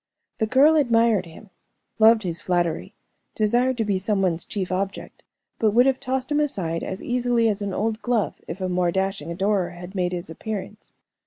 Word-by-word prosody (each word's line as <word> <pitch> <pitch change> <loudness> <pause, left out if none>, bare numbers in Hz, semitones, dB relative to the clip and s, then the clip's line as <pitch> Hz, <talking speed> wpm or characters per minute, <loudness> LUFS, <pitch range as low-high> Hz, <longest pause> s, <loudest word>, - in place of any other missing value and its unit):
The 220 - +1
girl 285 +7 +5
admired 230 - +3
him, 185 +5 -14 0.5
loved 220 0 +6
his 170 -2 -4
flattery, 175 -2 -1 0.4
desired 240 +4 +2
to 225 - 0
be 200 -2 0
some 200 0 0
one's 175 -2 -1
chief 190 -3 -3
object, 195 +1 -4 0.4
but 215 -1 +2
would 245 +1 +6
have 270 -1 +2
tossed 260 +2 -3
him 295 - +2
aside 180 - -1
as 190 +1 -5
easily 245 -2 +1
as 210 -1 -1
an 200 -1 -2
old 220 +3 -2
glove 240 -4 0
if 170 - -6
a 185 - 0
more 180 -1 +1
dashing 190 -3 -2
adorer 190 0 0
had 180 +1 -10
made 180 -2 -1
his 175 -1 -5
appearance. 210 +3 -7
205 Hz, 185 wpm, -24 LUFS, 185-235 Hz, 0.5 s, loved